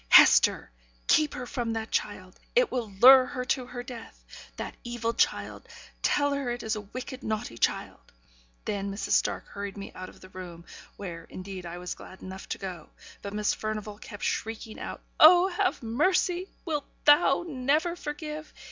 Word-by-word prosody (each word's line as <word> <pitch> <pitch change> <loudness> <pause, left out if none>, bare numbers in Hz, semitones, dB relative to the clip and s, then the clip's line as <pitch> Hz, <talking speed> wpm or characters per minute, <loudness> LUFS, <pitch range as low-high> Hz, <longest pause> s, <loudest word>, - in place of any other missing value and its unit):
'Hester! - - +7 0.3
keep 305 -1 +3
her 250 - -5
from 240 -2 -2
that 225 0 -4
child! 185 -3 -3 0.2
It - - +4
will 240 -4 -2
lure 255 +6 +8
her 255 -3 -4
to 255 -1 -1
her 245 -1 -6
death! 245 -3 -11
That - - -5
evil 240 -1 -2
child! 475 - 0 0.3
Tell 285 -1 +2
her 280 -3 -2
it 240 0 -3
is 220 0 -1
a 210 - -4
wicked, 255 +5 -7
naughty 215 - -3
child.' - - -1 0.5
Then, 200 -1 -2
Mrs. 200 - -4
Stark - - +2
hurried 200 0 -6
me 200 - -7
out 185 0 -8
of - - -17
the 185 - -14
room; 175 -2 -9 0.3
where, 170 -4 -7
indeed, 185 -1 -7
I 170 +1 -6
was 180 0 -4
glad 185 - -13
enough 190 0 -8
to - - -2
go; 180 -5 -7 0.3
but 200 - -6
Miss 210 -1 +1
Furnivall 215 -1 -4
kept 205 - -9
shrieking 220 0 -3
out, - - -6 0.2
'Oh, 350 +4 +8
have 370 -5 0
mercy! 360 - +1 0.2
Wilt 300 -4 -2 0.2
Thou 295 +3 +5
never 300 +4 +1
forgive! 305 -1 -6
230 Hz, 175 wpm, -28 LUFS, 200-290 Hz, 0.5 s, lure